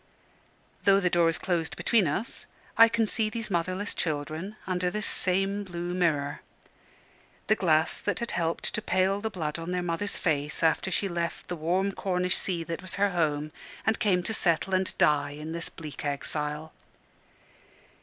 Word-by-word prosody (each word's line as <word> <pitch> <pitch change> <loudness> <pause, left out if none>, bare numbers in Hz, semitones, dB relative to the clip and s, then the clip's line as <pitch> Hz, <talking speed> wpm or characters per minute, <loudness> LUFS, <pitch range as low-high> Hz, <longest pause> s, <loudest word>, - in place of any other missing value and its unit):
Though 195 0 +6
the 180 -2 +1
door 170 -1 +4
is 165 - 0
closed 170 -3 -1
between 220 -7 +3
us, 190 - -2 0.3
I 230 - +9
can 225 -1 +2
see 215 0 +1
these 225 -1 -4
motherless 185 +3 -1
children 155 +5 -3
under 180 -1 0
this 210 +2 -2
same 195 +2 +1
blue 175 -2 -4
mirror 155 -6 0 1.0
the - - +4
glass 160 -6 +2
that - - -1
had 235 - -2
helped 165 -1 -1
to 220 - -1
pale 195 0 +1
the 220 - -1
blood 160 -5 -3
on 165 +1 -5
their 180 0 -1
mother's 175 +4 0
face 150 -2 -1
after 165 +3 +2
she 195 +1 0
left 170 -2 -3
the 175 - -2
warm 180 +5 +1
Cornish 180 -2 0
sea 175 -3 -1
that 165 +1 -5
was 185 -1 -2
her 200 +1 +2
home, 155 -3 0 0.3
and 220 - +2
came 185 -6 +2
to 220 - -1
settle 180 -1 +2
and 185 0 0
die 145 0 +3
in 155 +1 -6
this 170 0 -2
bleak 155 -4 -8
exile. 150 +2 -3
180 Hz, 175 wpm, -28 LUFS, 160-195 Hz, 1.0 s, I